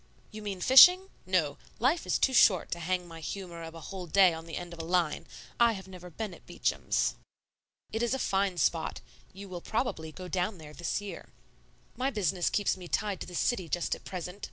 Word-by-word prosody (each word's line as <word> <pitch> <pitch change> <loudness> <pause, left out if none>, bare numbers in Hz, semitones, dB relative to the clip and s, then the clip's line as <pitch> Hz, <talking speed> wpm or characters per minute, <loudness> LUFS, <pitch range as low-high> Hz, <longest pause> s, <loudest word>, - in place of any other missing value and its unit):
"You 215 - -8
mean 200 -3 -5
fishing? 360 - +8 0.2
No; 175 -6 +1 0.2
life 275 +8 +1
is - - +2
too 265 - +2
short 190 -8 +5
to 170 - -2
hang 180 +1 -2
my 165 -1 -10
humor 170 +1 -6
of 165 0 -8
a - - -8
whole 185 +2 -7
day 185 +1 +5
on 165 0 -8
the 165 - -5
end 175 -1 -7
of 170 - -11
a - - -4
line. 170 -2 0 0.3
I 235 -1 +5
have 190 -3 -8
never 180 -1 -10
been 205 +3 -5
at - - -16
Beacham's." - - 0 0.8
"It 220 - -2
is 240 +2 +1
a - - -1
fine 195 -6 0
spot. 140 - 0 0.3
You 200 +1 -10
will 180 -2 -7
probably 165 -9 -2
go 185 +3 -9
down 185 +2 -1
there 150 -2 -11
this 175 +5 -2
year." 205 -1 -8 0.7
"My 260 +2 0
business 190 - 0
keeps 205 - +1
me 180 -2 -10
tied 200 0 -1
to - - -5
the 180 - -8
city 185 -3 0
just 175 +1 0
at - - -7
present. 180 +1 -6
185 Hz, 215 wpm, -30 LUFS, 170-205 Hz, 0.8 s, fishing